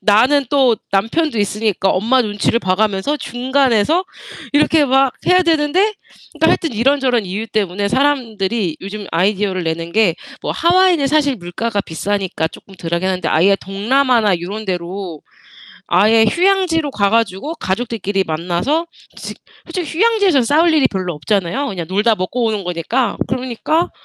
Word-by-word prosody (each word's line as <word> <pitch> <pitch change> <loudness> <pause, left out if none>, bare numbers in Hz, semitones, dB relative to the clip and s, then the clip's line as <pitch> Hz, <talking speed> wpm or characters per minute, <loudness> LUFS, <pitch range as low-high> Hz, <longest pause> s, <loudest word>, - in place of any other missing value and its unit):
나는 250 +7 +3
또 260 -5 +3
남편도 230 +7 0
있으니까 205 -1 0
엄마 235 +7 +2
눈치를 210 +1 0
봐 185 -5 0
가면서 215 +7 0
중간에서 260 - +1 0.5
이렇게 300 +1 +3
막 270 -1 +3
해야 365 0 +5
되는데 340 +6 +1 0.4
그니까 - - +1
하여튼 325 -5 +1
이런저런 250 -1 +1
이유 200 +5 -4
때문에 200 -2 -1
사람들이 225 - 0
요즘 200 +1 -7
아이디어를 190 +1 0
내는 165 +1 -3
게 210 -6 +3 0.3
뭐 - - -3
하와이는 345 -3 +3
사실 285 -2 +1
물가가 205 +4 -3
비싸니까 190 -1 -2
쪼끔 195 - -15
덜하긴 170 +1 -2
한데 185 -1 -1
아예 195 +5 +3
동남아나 215 0 +1
요런 205 +5 -6
데로 180 -3 -5 0.7
아예 215 +5 +4
휴양지로 345 - +1
가 200 -4 +1
가지고 225 - -1
가족들끼리 200 - -2
만나서 175 - -1 0.3
솔직 - - -8 0.3
솔직히 335 -2 -5
휴양지에선 405 - +3
싸울 320 +6 +3
일이 300 -3 +4
별로 185 -3 -4
없잖아요 200 - -1
그냥 180 -8 -4
놀다 210 +4 +2
먹고 220 +7 -2
오는 215 -3 -1
거니까. 180 +9 -1
그러니까 255 +6 -1
220 Hz, 360 characters per minute, -17 LUFS, 190-280 Hz, 0.7 s, 해야